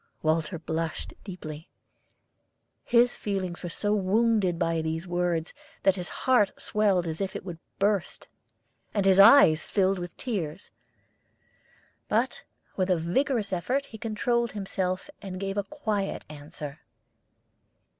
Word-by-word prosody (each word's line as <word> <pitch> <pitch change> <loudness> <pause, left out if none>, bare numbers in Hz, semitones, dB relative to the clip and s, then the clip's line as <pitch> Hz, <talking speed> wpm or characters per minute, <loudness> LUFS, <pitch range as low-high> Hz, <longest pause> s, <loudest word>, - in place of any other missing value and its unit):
Walter 160 +2 +1
blushed 160 0 -3
deeply. 160 -5 -8 1.1
His 240 0 +4
feelings 190 -4 -3
were 175 - -4
so 205 +4 0
wounded 205 -2 +2
by 165 -1 0
these 160 +2 -3
words 175 -2 -1 0.3
that 195 -1 +4
his 180 -1 -3 0.2
heart 245 -7 +3
swelled 200 -4 +1
as 160 +1 -4
if 195 - -3
it - - -6
would 175 -3 -7 0.2
burst, 200 -2 0 0.7
and 200 -2 +1
his 190 0 +5
eyes 200 - +8
filled 195 -1 +2
with 175 0 -7
tears. 185 - -4 1.4
But - - 0 0.3
with 185 -1 0
a 180 - +3
vigorous 205 - 0
effort 255 +11 0
he 220 -5 -11
controlled 235 +2 0
himself, 190 -2 -2
and 190 -2 -6
gave 195 0 -3
a 205 - 0
quiet 215 -6 -3
answer. 150 0 -8
190 Hz, 130 wpm, -27 LUFS, 170-210 Hz, 1.4 s, eyes